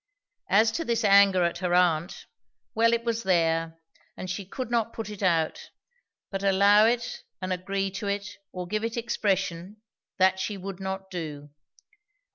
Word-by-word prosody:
As 220 +3 +4
to 330 - -2
this 235 -5 -1
anger 200 -2 +6
at 170 0 -1
her 180 -1 0
aunt, 175 -1 +1 0.5
well, 230 +1 +3
it 235 0 0
was 230 -1 -1
there, 165 -4 +1 0.4
and 185 - -5
she 190 0 -5
could 250 +3 -6
not 230 -1 0
put 225 -2 -6
it 210 - -9
out; 165 -4 0 0.6
but 195 -1 -3
allow 200 +2 +5
it 235 0 -1 0.2
and 185 0 -2
agree 195 +1 -2
to 200 +2 -5
it, 200 +1 -3
or 180 -1 -5
give 215 +4 -2
it 230 +1 -3
expression, 195 -3 -2 0.3
that 190 0 +3
she 200 +2 -3
would 195 0 -7
not 190 0 -5
do. 150 -5 -6
195 Hz, 165 wpm, -27 LUFS, 180-215 Hz, 0.6 s, anger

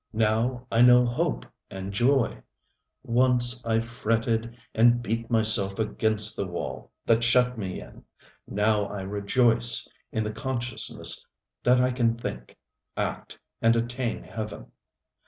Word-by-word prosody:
Now 115 +3 0
I 115 - +3
know 125 0 +7
hope 60 - -2 0.2
and 95 +1 -7
joy. 125 +4 +1 0.6
Once 125 0 +1
I 115 -1 +1
fretted 115 -1 -2 0.2
and 120 +2 +4
beat 115 +1 -3
myself 110 -4 +4
against 110 -1 +1
the 100 - -3
wall 90 -1 -6
that 115 0 +3
shut 125 +1 +4
me 95 -5 -5
in. - - -14 0.4
Now 105 0 +1
I 100 -1 -6
rejoice 115 +4 +2 0.2
in 110 - -1
the 105 0 -4
consciousness 120 0 -1 0.4
that 125 +1 +3
I 125 0 +2
can 115 -2 0
think, - - -7 0.4
act - - -4 0.2
and 115 +1 +4
attain 120 +1 -2
heaven. 105 - -8
115 Hz, 130 wpm, -26 LUFS, 105-120 Hz, 0.6 s, know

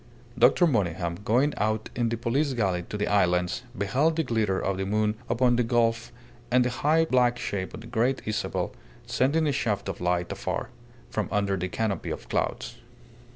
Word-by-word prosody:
Dr. 125 +9 +5
Monygham, 90 - 0
going 130 +8 +2
out 110 +1 -1
in 120 -1 +1
the 115 - -2
police 135 +5 0
galley 95 -7 0
to 105 - -4
the 105 - 0
islands, 90 0 +1 0.2
beheld 135 +11 +1
the 160 - +1
glitter 110 -7 0
of 95 -1 -1
the 95 - -2
moon 105 +1 +1 0.2
upon 120 0 +3
the 125 - +3
gulf 115 -1 +1 0.4
and 125 0 +4
the 125 - 0
high 155 +6 +2
black 125 -4 +3
shape 100 -6 -4
of 110 - -9
the - - -11
Great 120 +3 0
Isabel 110 -1 -2 0.3
sending 150 +5 +1
a 145 - +2
shaft 105 -8 -1
of 95 -3 -5
light 90 -1 0
afar, 125 - -3 0.4
from 105 -4 -2
under 100 -1 +1
the 90 0 -3
canopy 110 0 -2
of - - -6
clouds. - - -2
115 Hz, 185 wpm, -27 LUFS, 100-125 Hz, 0.4 s, Dr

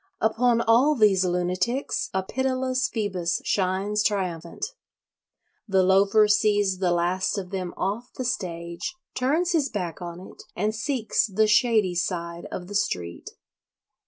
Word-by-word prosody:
Upon 230 +2 +2
all 245 +7 +4
these 205 -6 +4
lunatics 180 +9 -1
a 190 0 -1
pitiless 255 +3 0
Phoebus 190 -5 -2
shines 195 +2 0
triumphant. 180 - -2 1.0
The 190 -2 +3
Loafer 195 +3 +4
sees 205 -2 +2
the 185 -2 +1
last 175 +3 0
of 185 -2 -5
them 185 -2 -3
off 210 +6 -3
the 255 - -5
stage, 170 - -4 0.2
turns 305 +8 +1
his 305 -5 +1
back 180 -4 -4
on 175 0 -6
it, 185 - -12
and 210 +3 0
seeks 225 0 0
the 215 +2 +2
shady 215 -3 +3
side 170 -1 -3
of 180 - -5
the 200 - -9
street. 90 - -2
200 Hz, 135 wpm, -25 LUFS, 180-230 Hz, 1.0 s, all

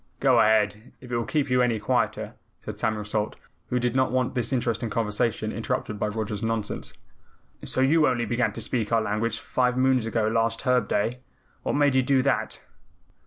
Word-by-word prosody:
"Go - - +4
ahead, 105 +1 +2
if 125 -1 -12
it - - 0
will 115 - -1
keep 145 -4 -1
you 125 0 +4
any 120 -3 +1
quieter," 125 +4 -1 0.3
said - - -8
Samuel 105 -1 -1
Salt, 105 0 -2 0.3
who 125 - 0
did 120 0 0
not 130 0 +2
want 130 -1 0
this 125 -1 -2
interesting 120 -2 -1
conversation 110 0 -1
interrupted 105 -2 -3
by 105 - 0
Roger's 105 -1 -3
nonsense. 115 -2 -3 0.7
"So 130 - -1
you 150 +3 +4
only 120 -2 0
began 120 +1 0
to 115 - -5
speak 110 0 -1
our 115 - +4
language 110 +2 -1
five 125 -1 0
moons 130 -3 +2
ago 115 -1 0
last 115 0 0
Herb 125 -4 +2
Day? 115 +5 0 0.4
What - - -2
made 145 -1 +3
you 130 - +4
do 130 0 +2
that?" 135 -1 -1
115 Hz, 190 wpm, -26 LUFS, 110-130 Hz, 0.7 s, Go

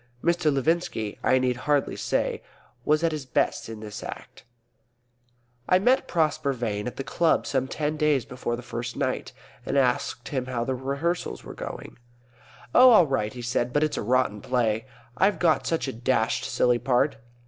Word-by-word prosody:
Mr. 170 -2 +2
Levinski, 135 - -1
I 130 - +3
need 125 -1 +1
hardly 145 +2 0
say, - - -1 0.4
was 155 +4 +2
at 165 - +2
his 150 -4 -5
best 125 - 0
in 110 -1 -8
this 105 -1 -7
Act. - - -9 1.2
I 185 - +6
met 250 +8 +2
Prosper 155 -4 +1
Vane 110 -4 -3
at 125 - -5
the 135 - -4
club 165 +5 +1
some 130 -1 0
ten 150 +2 -2
days 150 -5 +2
before 125 -2 -3
the 120 - -9
first 120 0 -5
night, - - -2 0.3
and - - -1
asked - - 0
him 130 -2 -2
how 125 -2 -2
rehearsals 140 +7 -2
were - - -9
going. - - -8 0.7
"Oh, 255 0 +8
all 215 -8 +7
right," 120 -7 -1
he 120 +1 -8
said. 120 0 -1
"But 145 +4 +2
it's 155 - 0
a - - -1
rotten 120 -2 +1
play. 115 -1 0 0.3
I've 195 +5 +3
got 165 -3 +2
such 165 -3 0
a 135 - -3
dashed 120 +2 0
silly 120 -1 +2
part." 130 +3 +1
135 Hz, 175 wpm, -26 LUFS, 120-155 Hz, 1.2 s, Oh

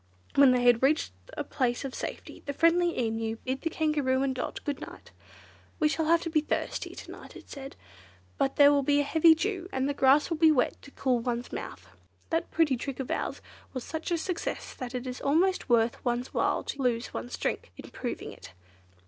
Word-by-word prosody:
When 275 -2 +7
they 250 -1 +2
had 245 -1 +5
reached 295 +4 +2 0.3
a - - -1
place 250 -1 -1
of 265 - -5
safety, - - -6
the 285 - -2
friendly 340 +3 +3
Emu 225 -1 -1
bid 260 +1 -2
the 330 - -1
Kangaroo 290 -5 +1
and 270 -1 0
Dot 255 - -4
good 290 -1 -3
night. - - -10 0.7
"We 310 - +4
shall 315 +1 0
have 335 +1 +3
to 330 - -3
be 310 -1 +3
thirsty 305 - -3
to - - -9
night," - - -12
it - - -13
said, 275 -1 -8 0.6
"but 270 - +1
there 285 0 +7
will 285 -1 +3
be 285 +1 +2
a - - +3
heavy 320 +3 +5
dew, 370 +1 -3
and 265 +1 0
the 285 - 0
grass 280 +4 +4
will 330 - 0
be 320 0 +6
wet 255 -5 +3
enough - - -28
to - - -13
cool 260 -3 0
one's 240 +1 -3
mouth. - - -7 0.4
That 330 0 0
pretty 300 -6 +2
trick 270 +2 -5
of 265 - -4
ours - - -2 0.3
was 255 - -3
such 320 -1 -5
a 345 - +1
success 345 +1 -4
that 255 0 -6
it 250 +1 -3
is 250 0 -5
almost 340 +4 +2
worth 230 -1 +2
one's 245 0 -1
while - - +1
to 280 - -5
lose 245 -2 0
one's 115 +2 -5
drink - - -3
in - - -10
proving - - -5
it." 85 - -13
275 Hz, 215 wpm, -28 LUFS, 250-315 Hz, 0.7 s, When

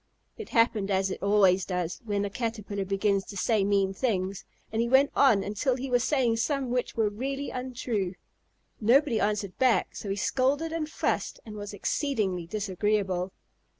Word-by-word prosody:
It 440 - -8
happened 225 -3 +2
as 190 -1 +1
it - - -5
always 195 -2 +4
does 180 -2 -3
when 205 -2 -1
a - - -2
Caterpillar 210 -3 -3
begins 195 0 +1
to 200 - -8
say 215 +2 +2
mean 195 -1 +2
things, 195 -4 -1 0.3
and 225 +1 0
he 235 - 0
went 270 +3 +5
on 230 -8 +5
until 220 +6 0
he 260 +1 -5
was 245 -1 +3
saying 250 -6 +2
some 260 +2 -1
which 250 0 -1
were 225 -2 +2
really 270 +7 -3
untrue. 240 -7 -3 0.6
Nobody 240 +1 +4
answered 205 -2 -1
back, 255 -3 +2
so 205 - -6
he 195 - 0
scolded 275 +9 0
and 320 -2 -2
fussed - - -2
and 215 -2 -8
was 205 -1 -6
exceedingly 205 - -1
disagreeable. 195 -1 -1
210 Hz, 170 wpm, -28 LUFS, 195-250 Hz, 0.6 s, went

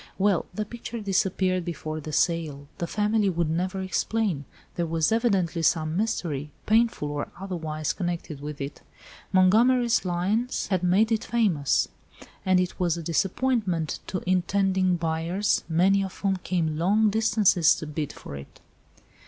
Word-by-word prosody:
"Well, 195 -3 +2
the 215 - -3
picture 235 +1 -7
disappeared 190 -2 0
before 155 -2 -5
the 155 - -7
sale. 155 -4 0
The 170 - -2
family 210 +1 +1
would 170 -3 0
never 185 +3 -1
explain. 190 -5 -1 0.3
There 170 -1 -2
was 160 +1 +1
evidently 195 -8 +1
some 155 0 +1
mystery, 170 -9 -2 0.2
painful 220 -9 +2
or 145 0 -4
otherwise, 160 -5 -3
connected 170 -5 -4
with 150 0 -6
it. 140 +1 -6 0.5
Montgomery's 230 +6 +4
lines 195 +7 -1
had 185 -3 +1
made 195 +5 +3
it 220 - 0
famous. 195 -12 +2 0.6
And 185 -1 +3
it 180 +1 -2
was 175 -2 +1
a 170 - -5
disappointment 185 - 0
to 185 - -3
intending 185 0 +2
buyers, 170 +4 0
many 190 +4 +3
of 190 -1 -6
whom 195 -1 0
came 165 -4 -1
long 205 +5 +3
distances 205 -6 +4
to - - -6
bid 150 -1 -4
for - - -9
it." 70 0 -11
185 Hz, 145 wpm, -26 LUFS, 160-205 Hz, 0.6 s, Montgomery's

